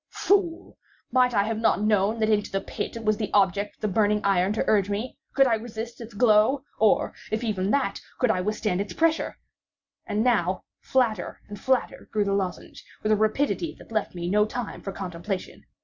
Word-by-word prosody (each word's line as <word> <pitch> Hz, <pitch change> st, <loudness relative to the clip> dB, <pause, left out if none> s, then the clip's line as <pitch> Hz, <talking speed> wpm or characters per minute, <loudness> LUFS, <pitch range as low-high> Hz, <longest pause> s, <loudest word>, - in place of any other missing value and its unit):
Fool! 370 Hz, -4 st, 0 dB, 0.3 s
might 250 Hz, -1 st, +4 dB
I 200 Hz, -, +4 dB
have 220 Hz, +1 st, -2 dB
not 225 Hz, -, +3 dB
known 210 Hz, +1 st, +2 dB
that 215 Hz, -, +2 dB
into 210 Hz, -1 st, +1 dB
the 195 Hz, -, 0 dB
pit 195 Hz, -, -5 dB
it 230 Hz, -1 st, -6 dB
was 215 Hz, 0 st, +2 dB
the 215 Hz, -1 st, -2 dB
object 200 Hz, +1 st, +2 dB
of -, -, -39 dB
the 215 Hz, -, 0 dB
burning 210 Hz, +1 st, +2 dB
iron 195 Hz, -1 st, +2 dB
to 215 Hz, -, 0 dB
urge 205 Hz, -2 st, +2 dB
me? 215 Hz, +5 st, -3 dB, 0.2 s
Could 270 Hz, 0 st, +6 dB
I 245 Hz, -, +3 dB
resist 225 Hz, +1 st, -5 dB
its 230 Hz, -1 st, -10 dB
glow? 225 Hz, +4 st, +4 dB, 0.2 s
or, 215 Hz, -1 st, +3 dB, 0.2 s
if 220 Hz, +2 st, -2 dB
even 200 Hz, -4 st, -1 dB
that, 265 Hz, -5 st, 0 dB, 0.2 s
could 250 Hz, -3 st, +3 dB
I 185 Hz, -, 0 dB
withstand 210 Hz, -1 st, -1 dB
its 200 Hz, -, -5 dB
pressure? 325 Hz, -1 st, +1 dB, 0.7 s
And 210 Hz, +1 st, 0 dB
now, 195 Hz, -7 st, +1 dB, 0.2 s
flatter 230 Hz, -8 st, 0 dB
and 205 Hz, -1 st, -8 dB
flatter 260 Hz, -2 st, -1 dB
grew 210 Hz, -1 st, +1 dB
the 200 Hz, -, 0 dB
lozenge, 190 Hz, -3 st, -3 dB, 0.2 s
with 215 Hz, -, +1 dB
a -, -, +6 dB
rapidity 275 Hz, +10 st, 0 dB
that -, -, -15 dB
left 215 Hz, -4 st, -2 dB
me 175 Hz, 0 st, -4 dB
no 210 Hz, +3 st, +4 dB
time 245 Hz, +1 st, -5 dB
for 195 Hz, -, -5 dB
contemplation. 185 Hz, 0 st, -5 dB
215 Hz, 200 wpm, -26 LUFS, 200-235 Hz, 0.7 s, Could